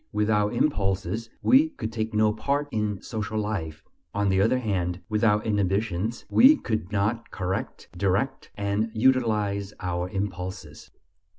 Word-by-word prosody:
Without 105 0 +1
impulses 100 - 0
we 285 +5 +5
could 275 - -6
take 110 -1 -2
no 105 0 +3
part 140 +6 -1
in 105 -3 -2
social 110 -1 -4
life; 100 -8 -3 0.3
on 100 -1 +1
the 95 0 +3
other 115 +5 +3
hand, 95 -7 -1
without 105 -1 +2
inhibitions 105 +1 -1
we 275 +5 +7
could 110 - -3
not 105 +3 -1
correct, 95 0 -4
direct, 100 +9 -1
and 100 +2 -1
utilize 105 -5 +1
our 90 0 -2
impulses. 95 -5 -5
105 Hz, 130 wpm, -26 LUFS, 95-110 Hz, 0.3 s, we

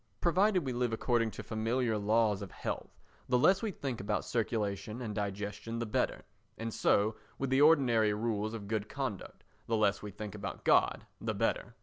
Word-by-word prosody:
Provided 185 0 +3
we 130 - -2
live 120 -1 0
according 115 0 +1
to - - -8
familiar 115 +1 0
laws 105 0 +2
of 100 - -6
health, - - -5 0.3
the 125 - +4
less 190 +10 +4
we 225 - -1
think 135 - -4
about 105 +1 -1
circulation 110 -1 -2
and 115 -4 -4
digestion 105 +2 -4
the 115 - -2
better; 105 - -1 0.3
and 115 0 -4
so 105 +2 +2 0.2
with 135 -1 -2
the 135 +1 +4
ordinary 125 -9 +5
rules 110 0 -1
of 105 -3 -7
good 110 0 -2
conduct, 135 -9 -5 0.2
the 115 - +1
less 105 -2 +2
we 105 - -6
think 105 +1 -7
about 100 -3 -6
God - - +3
the - - -2
better. - - -1
110 Hz, 185 wpm, -32 LUFS, 105-125 Hz, 0.3 s, ordinary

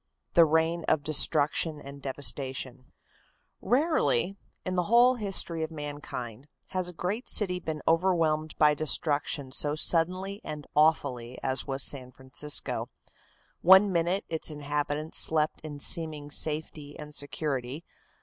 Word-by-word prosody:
The 170 - +6
Reign 160 +2 0
of 155 -2 +1
Destruction 150 +1 +2
and 140 0 -11
Devastation 135 -2 -4 0.7
Rarely, 240 - +1 0.3
in 185 - -3
the 180 -1 0
whole 240 +2 +5
history 195 -7 +3
of 160 - -3
mankind, 145 -5 -7 0.2
has 185 -1 -1
a - - -10
great 190 +9 -4
city 180 -4 +1
been 160 -3 -6
overwhelmed 165 -3 +1
by 150 -1 +5
destruction 145 -2 0
so 145 +2 +2
suddenly 185 +5 0
and 150 -1 -7
awfully 135 -6 +1
as 130 +1 -1
was 135 0 +2
San 130 -3 0
Francisco. 130 +3 0 0.7
One 190 +3 +6
minute 175 +3 0
its 160 0 -3
inhabitants 150 +1 -2
slept 155 -1 +2
in 150 -2 -8
seeming 150 -1 0
safety 150 -1 -3
and 150 0 -10
security. 145 0 -4
155 Hz, 130 wpm, -28 LUFS, 145-170 Hz, 0.7 s, The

